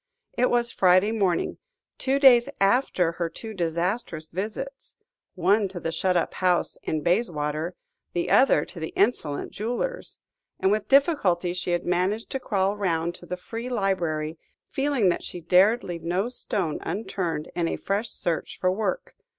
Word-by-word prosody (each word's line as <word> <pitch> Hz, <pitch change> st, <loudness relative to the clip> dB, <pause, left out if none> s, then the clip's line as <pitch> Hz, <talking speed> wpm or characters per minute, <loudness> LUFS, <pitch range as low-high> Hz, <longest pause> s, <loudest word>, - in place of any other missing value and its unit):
It 250 Hz, -, +2 dB
was 240 Hz, 0 st, +2 dB
Friday 185 Hz, +3 st, +4 dB
morning, 195 Hz, -6 st, 0 dB, 0.4 s
two 270 Hz, +1 st, +1 dB
days 255 Hz, -4 st, +6 dB
after 195 Hz, -4 st, +2 dB
her 170 Hz, 0 st, -3 dB
two 220 Hz, +6 st, -8 dB
disastrous 170 Hz, -1 st, -2 dB
visits 220 Hz, +9 st, -5 dB, 0.4 s
one 195 Hz, +3 st, +3 dB
to 185 Hz, -1 st, -7 dB
the 165 Hz, -, -3 dB
shut 180 Hz, +2 st, +1 dB
up 170 Hz, -, -1 dB
house 180 Hz, -2 st, +1 dB
in 155 Hz, -, -2 dB
Bayswater, 170 Hz, -3 st, 0 dB, 0.4 s
the 175 Hz, -, -1 dB
other 265 Hz, -, +5 dB
to 175 Hz, -, -9 dB
the 160 Hz, -, -5 dB
insolent 180 Hz, -9 st, 0 dB
jewellers 245 Hz, -, -3 dB, 0.4 s
and 190 Hz, -, +2 dB
with 210 Hz, 0 st, 0 dB
difficulty 210 Hz, -, +3 dB
she 180 Hz, 0 st, -4 dB
had 175 Hz, 0 st, 0 dB
managed 185 Hz, +5 st, 0 dB
to 270 Hz, -, -2 dB
crawl 200 Hz, -4 st, 0 dB
round 170 Hz, -4 st, 0 dB
to 175 Hz, -, -12 dB
the 180 Hz, -, -4 dB
Free 230 Hz, +6 st, -6 dB
Library, 170 Hz, -8 st, -1 dB, 0.3 s
feeling 270 Hz, -8 st, +2 dB
that 175 Hz, -, -1 dB
she 175 Hz, -, -6 dB
dared 185 Hz, +7 st, +4 dB
leave 170 Hz, -2 st, -5 dB
no 180 Hz, +7 st, 0 dB
stone 195 Hz, -9 st, -3 dB
unturned 180 Hz, -7 st, -3 dB
in 170 Hz, -1 st, 0 dB
a -, -, -1 dB
fresh 205 Hz, +4 st, -2 dB
search 170 Hz, -2 st, -2 dB
for 185 Hz, -, +2 dB
work. 220 Hz, -, -2 dB
185 Hz, 160 wpm, -25 LUFS, 170-225 Hz, 0.4 s, days